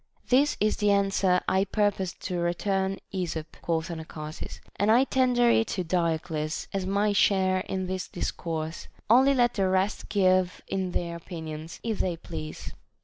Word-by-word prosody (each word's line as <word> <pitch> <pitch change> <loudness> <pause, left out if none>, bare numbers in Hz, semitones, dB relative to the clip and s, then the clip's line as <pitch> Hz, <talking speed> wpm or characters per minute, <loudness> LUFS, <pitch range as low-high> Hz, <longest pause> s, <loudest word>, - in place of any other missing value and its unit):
This 275 +4 +4
is 215 0 +2
the 210 -1 +2
answer 195 -2 +3
I 190 +1 +3
purpose 200 -2 0
to 180 -2 -3
return 190 +3 0 0.2
Esop, 165 -4 -4
quoth 165 0 -1
Ana 160 -1 -5
charsis, 155 -1 -8 0.2
and 205 +2 +2
I 235 +4 +6
tender 250 -2 +3
it 225 - +3
to 185 - 0
Diodes 165 -2 -1
as 195 -1 -2
my 205 +2 +2
share 190 -2 +3
in 190 -1 -1
this 185 0 -3
dis - - -3
course; 160 -1 -5 0.2
only 265 +3 +6
let 245 -2 +3
the 195 -3 +1
rest 190 +2 0
give 185 -2 +2
in 190 -2 -2
their 170 -1 -2
opinions, 160 -2 -7
if 225 -3 -2
they 175 -3 0
please. 155 -2 -7
185 Hz, 165 wpm, -27 LUFS, 170-205 Hz, 0.2 s, I